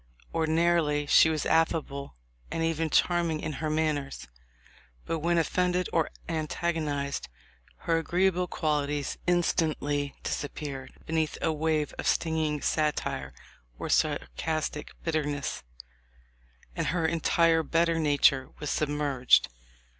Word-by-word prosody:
Ordinarily 160 Hz, -2 st, +2 dB
she 160 Hz, -, +6 dB
was 155 Hz, -2 st, -1 dB
affable 160 Hz, -4 st, 0 dB, 0.3 s
and 165 Hz, -, -2 dB
even 165 Hz, 0 st, 0 dB
charming 170 Hz, -1 st, +2 dB
in 155 Hz, -, -4 dB
her 155 Hz, -, -1 dB
manners; 150 Hz, -, -1 dB, 0.8 s
but 165 Hz, -, -2 dB
when 170 Hz, +2 st, +1 dB
offended 180 Hz, +2 st, +1 dB
or 165 Hz, -2 st, +2 dB, 0.2 s
antagonized, 155 Hz, -3 st, -2 dB, 0.6 s
her 165 Hz, -1 st, +2 dB
agreeable 180 Hz, +2 st, +1 dB
quali 150 Hz, -5 st, 0 dB
ties 145 Hz, -1 st, -3 dB
instantly 155 Hz, -5 st, +1 dB
disappeared 140 Hz, -2 st, -4 dB
beneath 160 Hz, -1 st, -1 dB
a 160 Hz, -, 0 dB
wave 155 Hz, -1 st, 0 dB
of -, -, -2 dB
sting 160 Hz, -1 st, +1 dB
ing 150 Hz, -2 st, -1 dB
satire 150 Hz, -, -1 dB, 0.5 s
or -, -, -5 dB
sarcastic 155 Hz, -, -1 dB
bitterness, 150 Hz, -4 st, -2 dB, 1.1 s
and -, -, -1 dB
her 165 Hz, -1 st, 0 dB
entire 165 Hz, 0 st, +3 dB
better 165 Hz, +2 st, +1 dB
nature 140 Hz, -3 st, +3 dB
was 150 Hz, -1 st, -3 dB
submerged. 145 Hz, -, +2 dB
155 Hz, 115 wpm, -28 LUFS, 145-165 Hz, 1.1 s, she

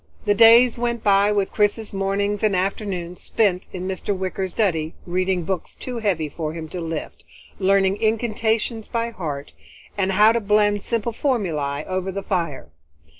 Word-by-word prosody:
The 205 Hz, -, +4 dB
days 230 Hz, +3 st, +6 dB
went 235 Hz, -1 st, -1 dB
by 200 Hz, 0 st, +4 dB
with 200 Hz, -2 st, 0 dB
Chris's 210 Hz, +1 st, 0 dB
mornings 200 Hz, +1 st, -1 dB
and 210 Hz, -3 st, +2 dB
afternoons 185 Hz, -2 st, -3 dB
spent 195 Hz, -5 st, 0 dB
in 185 Hz, 0 st, -5 dB
Mr. 190 Hz, +1 st, -2 dB
Wicker's 190 Hz, 0 st, -3 dB
study, 165 Hz, -7 st, 0 dB
reading 185 Hz, 0 st, 0 dB
books 185 Hz, +1 st, -4 dB
too 250 Hz, -2 st, -6 dB
heavy 185 Hz, -8 st, 0 dB
for 155 Hz, +1 st, -5 dB
him 160 Hz, -1 st, -6 dB
to 180 Hz, -, -5 dB
lift, 165 Hz, -1 st, -5 dB, 0.4 s
learning 195 Hz, 0 st, +3 dB
incantations 220 Hz, 0 st, 0 dB
by 235 Hz, 0 st, -2 dB
heart, 150 Hz, -9 st, -5 dB, 0.4 s
and 195 Hz, -1 st, 0 dB
how 210 Hz, +3 st, +6 dB
to 235 Hz, -, +1 dB
blend 205 Hz, -1 st, +2 dB
simple 230 Hz, +1 st, -2 dB
formulae 165 Hz, -, -1 dB
over 185 Hz, 0 st, -2 dB
the 200 Hz, +1 st, -5 dB
fire. 170 Hz, -, -3 dB
195 Hz, 160 wpm, -22 LUFS, 180-215 Hz, 0.4 s, days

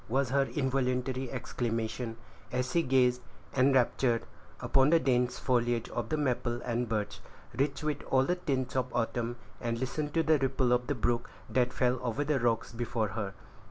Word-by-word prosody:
was 130 Hz, +2 st, +1 dB
her 135 Hz, 0 st, +2 dB
involuntary 130 Hz, -2 st, 0 dB
exclamation, 115 Hz, -2 st, -3 dB, 0.3 s
as 125 Hz, +1 st, -1 dB
she 170 Hz, -, +3 dB
gazed, 125 Hz, -3 st, +3 dB, 0.3 s
enraptured, 130 Hz, -2 st, +3 dB, 0.3 s
upon 135 Hz, +1 st, +3 dB
the 165 Hz, +1 st, +6 dB
dense 125 Hz, -2 st, +1 dB
foliage 120 Hz, -2 st, +1 dB
of -, -, -3 dB
the 155 Hz, -, 0 dB
maple 125 Hz, -4 st, 0 dB
and 120 Hz, -1 st, -1 dB
birch, 105 Hz, -2 st, -2 dB, 0.4 s
rich 140 Hz, +2 st, 0 dB
with 150 Hz, -1 st, -1 dB
all 130 Hz, 0 st, +4 dB
the 180 Hz, -, +1 dB
tints 135 Hz, -8 st, -2 dB
of 130 Hz, -1 st, 0 dB
autumn, 120 Hz, 0 st, -1 dB, 0.3 s
and 115 Hz, 0 st, -1 dB
listened 145 Hz, +4 st, -2 dB
to 165 Hz, +2 st, +2 dB
the 155 Hz, -1 st, +4 dB
ripple 130 Hz, -2 st, +1 dB
of 125 Hz, 0 st, +1 dB
the 145 Hz, -, 0 dB
brook 120 Hz, 0 st, 0 dB, 0.2 s
that 125 Hz, +2 st, +1 dB
fell 125 Hz, 0 st, +1 dB
over 125 Hz, +3 st, -1 dB
the 145 Hz, -1 st, +1 dB
rocks 115 Hz, -2 st, +1 dB
before 115 Hz, -2 st, -1 dB
her. 100 Hz, -1 st, -4 dB
125 Hz, 170 wpm, -31 LUFS, 120-135 Hz, 0.4 s, the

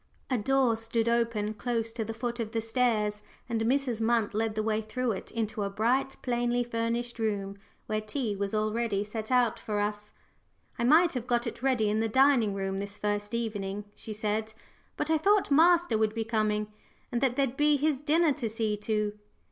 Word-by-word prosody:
A 255 Hz, -, +3 dB
door 260 Hz, +1 st, +2 dB
stood 225 Hz, 0 st, -1 dB
open 230 Hz, -3 st, +1 dB
close 230 Hz, 0 st, -2 dB
to 225 Hz, -, -2 dB
the 225 Hz, +1 st, -5 dB
foot 240 Hz, +1 st, -3 dB
of 225 Hz, -1 st, -3 dB
the 225 Hz, -, +1 dB
stairs, 225 Hz, -3 st, 0 dB, 0.3 s
and 230 Hz, -2 st, -1 dB
Mrs. 245 Hz, -1 st, +1 dB
Munt 225 Hz, -2 st, +1 dB
led 220 Hz, 0 st, -1 dB
the 215 Hz, -, 0 dB
way 220 Hz, 0 st, 0 dB
through 230 Hz, +3 st, -2 dB
it 190 Hz, -, -5 dB
into 220 Hz, -2 st, -3 dB
a 200 Hz, -, -1 dB
bright, 245 Hz, +7 st, 0 dB
plainly 240 Hz, 0 st, +1 dB
furnished 235 Hz, 0 st, -2 dB
room, 200 Hz, -3 st, -1 dB, 0.3 s
where 215 Hz, 0 st, -1 dB
tea 215 Hz, 0 st, -2 dB
was 200 Hz, +1 st, -2 dB
already 215 Hz, -1 st, 0 dB
set 215 Hz, +1 st, -6 dB
out 250 Hz, -3 st, +2 dB
for 210 Hz, -1 st, -2 dB
us. 210 Hz, 0 st, -2 dB, 0.7 s
"I -, -, 0 dB
might 325 Hz, +6 st, +5 dB
have 250 Hz, -2 st, -4 dB
got 240 Hz, -1 st, +1 dB
it -, -, -5 dB
ready 255 Hz, -5 st, +2 dB
in 210 Hz, +1 st, +1 dB
the 225 Hz, 0 st, 0 dB
dining 260 Hz, -4 st, +4 dB
room 195 Hz, 0 st, -2 dB
this 200 Hz, 0 st, -6 dB
first 205 Hz, +1 st, -2 dB
evening," 205 Hz, -3 st, -3 dB
she 220 Hz, -, -9 dB
said, 215 Hz, +1 st, -2 dB, 0.4 s
"but 315 Hz, -, -1 dB
I 320 Hz, -, +3 dB
thought 400 Hz, -1 st, +3 dB
master 330 Hz, -5 st, +5 dB
would 220 Hz, 0 st, +1 dB
be 225 Hz, -1 st, -1 dB
coming, 215 Hz, -1 st, 0 dB, 0.4 s
and 240 Hz, -, -1 dB
that 260 Hz, -3 st, +2 dB
there'd 270 Hz, -2 st, 0 dB
be 295 Hz, +1 st, +3 dB
his 290 Hz, -1 st, 0 dB
dinner 310 Hz, +1 st, +3 dB
to 250 Hz, -5 st, -3 dB
see 215 Hz, -1 st, -1 dB
to. 210 Hz, 0 st, -1 dB
225 Hz, 195 wpm, -29 LUFS, 210-245 Hz, 0.7 s, might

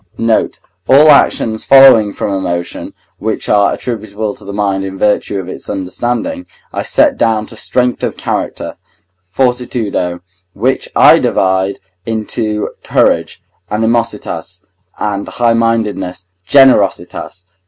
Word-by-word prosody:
Note. 115 Hz, -1 st, 0 dB, 0.3 s
All 150 Hz, +3 st, +7 dB
actions 110 Hz, -5 st, +2 dB
following 135 Hz, -6 st, +6 dB
from 100 Hz, -, -3 dB
emotion, 85 Hz, -2 st, -4 dB, 0.2 s
which -, -, -3 dB
are 100 Hz, -1 st, +3 dB
attributable 110 Hz, -3 st, -4 dB
to -, -, -15 dB
the 100 Hz, -, -7 dB
mind 100 Hz, -1 st, -1 dB
in 95 Hz, 0 st, -6 dB
virtue 105 Hz, 0 st, 0 dB
of 95 Hz, -2 st, -5 dB
its -, -, -8 dB
understanding, 120 Hz, -, -3 dB, 0.3 s
I -, -, -2 dB
set 290 Hz, -3 st, +2 dB
down 110 Hz, -2 st, +1 dB
to 110 Hz, -, -12 dB
strength 125 Hz, +2 st, -1 dB
of -, -, -3 dB
character -, -, -4 dB, 0.5 s
(fortitudo), 115 Hz, -6 st, -1 dB, 0.3 s
which 130 Hz, +6 st, -1 dB
I -, -, +7 dB
divide 95 Hz, +1 st, 0 dB, 0.3 s
into 110 Hz, -1 st, -2 dB
courage -, -, 0 dB, 0.3 s
(animositas) 115 Hz, +2 st, -2 dB, 0.4 s
and 100 Hz, -1 st, -3 dB
highmindedness 115 Hz, -6 st, -1 dB, 0.2 s
(generositas). 115 Hz, -8 st, +2 dB
110 Hz, 115 wpm, -13 LUFS, 100-120 Hz, 0.5 s, All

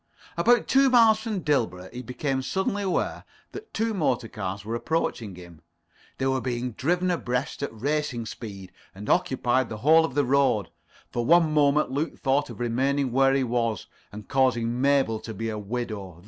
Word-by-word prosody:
About 240 Hz, -1 st, +3 dB
two 270 Hz, 0 st, +4 dB
miles 225 Hz, -3 st, +5 dB
from 220 Hz, -4 st, -3 dB
Dilborough 110 Hz, -, -1 dB
he 125 Hz, -, -6 dB
became 130 Hz, +2 st, -2 dB
suddenly 190 Hz, +7 st, -1 dB
aware 190 Hz, -2 st, -1 dB, 0.3 s
that 425 Hz, +2 st, -10 dB
two 225 Hz, 0 st, -1 dB
motor 130 Hz, -, 0 dB
cars 100 Hz, -2 st, -5 dB
were 110 Hz, -, -4 dB
approaching 120 Hz, -, -2 dB
him. 85 Hz, -3 st, -13 dB, 0.6 s
They 135 Hz, -, -2 dB
were 130 Hz, 0 st, +1 dB
being 125 Hz, 0 st, -3 dB
driven 180 Hz, +9 st, 0 dB
abreast 125 Hz, -5 st, -2 dB
at 140 Hz, -, -2 dB
racing 130 Hz, 0 st, -2 dB
speed, 100 Hz, -5 st, -8 dB, 0.2 s
and 105 Hz, +2 st, -9 dB
occupied 130 Hz, -8 st, +1 dB
the 110 Hz, -, -5 dB
whole 160 Hz, +2 st, +7 dB
of 160 Hz, -5 st, -3 dB
the 145 Hz, -1 st, +2 dB
road. 130 Hz, -8 st, +2 dB, 0.4 s
For 120 Hz, -, -1 dB
one 165 Hz, +2 st, +4 dB
moment 150 Hz, -1 st, +3 dB
Luke 145 Hz, +5 st, -2 dB
thought 135 Hz, +2 st, 0 dB
of -, -, -9 dB
remaining 130 Hz, +3 st, 0 dB
where 135 Hz, +2 st, +3 dB
he 135 Hz, -, +2 dB
was, 115 Hz, -5 st, -1 dB, 0.3 s
and 105 Hz, 0 st, -10 dB
causing 125 Hz, -2 st, +1 dB
Mabel 135 Hz, -5 st, +2 dB
to 110 Hz, 0 st, -8 dB
be 115 Hz, +3 st, -3 dB
a 110 Hz, -1 st, -4 dB
widow. 105 Hz, -5 st, -5 dB
130 Hz, 175 wpm, -26 LUFS, 115-155 Hz, 0.6 s, whole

